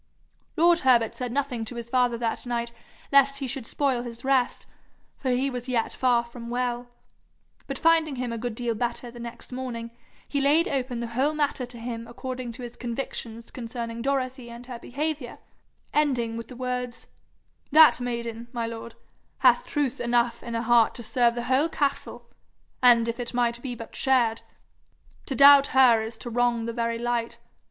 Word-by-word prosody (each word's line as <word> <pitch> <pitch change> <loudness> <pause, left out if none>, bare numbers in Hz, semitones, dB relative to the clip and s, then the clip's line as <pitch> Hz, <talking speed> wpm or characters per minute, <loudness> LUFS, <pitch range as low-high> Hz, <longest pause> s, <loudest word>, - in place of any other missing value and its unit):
Lord 340 +1 +5
Herbert 240 -5 +3
said 250 -2 -4
nothing 260 -3 -1
to 240 - -6
his 235 -1 -6
father 245 -1 +2
that 230 +1 -3
night 235 -1 -2 0.4
lest 275 0 +5
he 275 - -3
should 250 -2 -4
spoil 270 -4 0
his 240 0 -8
rest, 265 -2 +1 0.5
for 265 - -3
he 255 +2 +1
was 250 0 -5
yet 235 -3 0
far 245 -2 +2
from 235 0 -9
well, 245 0 -2 0.8
but 275 - -4
finding 320 -2 +3
him 245 -2 -3
a - - -3
good 240 -1 -4
deal 240 0 -1
better 240 +1 -3
the 240 - -11
next 235 +1 -8
morning, 245 -2 -5 0.4
he 280 - -1
laid 300 +5 +4
open 250 -3 -2
the 235 - -4
whole 280 +5 +1
matter 285 -4 -1
to 245 -1 -8
him 230 0 -6
according 255 0 -6
to 250 +2 -8
his 240 0 -8
convictions 235 -2 -5
concerning 230 -1 -5
Dorothy 260 -2 -2
and 235 +1 -10
her 245 -2 -8
behaviour, 285 0 -4 0.6
ending 250 -7 +1
with 230 0 -6
the 255 - -10
words: 250 -1 -4 0.7
'That 310 -1 +7
maiden, 235 -1 -4
my 235 -2 -2
lord, 230 0 -7 0.4
hath - - +4
truth 285 -2 -1
enough 240 0 +1
in 235 -1 -5
her 230 - -1
heart 235 -1 +4
to 240 - -6
serve 235 +1 +2
the 240 - -3
whole 265 +6 +2
castle, 285 -3 -2 0.5
an' 240 -2 +6
if 230 +1 -3
it 240 0 -4
might 240 -1 +1
be 245 -2 -5
but 230 -1 -10
shared. 240 -4 +2 0.9
To 270 - -2
doubt 280 +1 +8
her 240 -4 +7
is 225 +1 -6
to 240 - -7
wrong 240 -1 +1
the 230 - -3
very 230 -1 -1
light. 235 0 -2
245 Hz, 180 wpm, -26 LUFS, 235-265 Hz, 0.9 s, doubt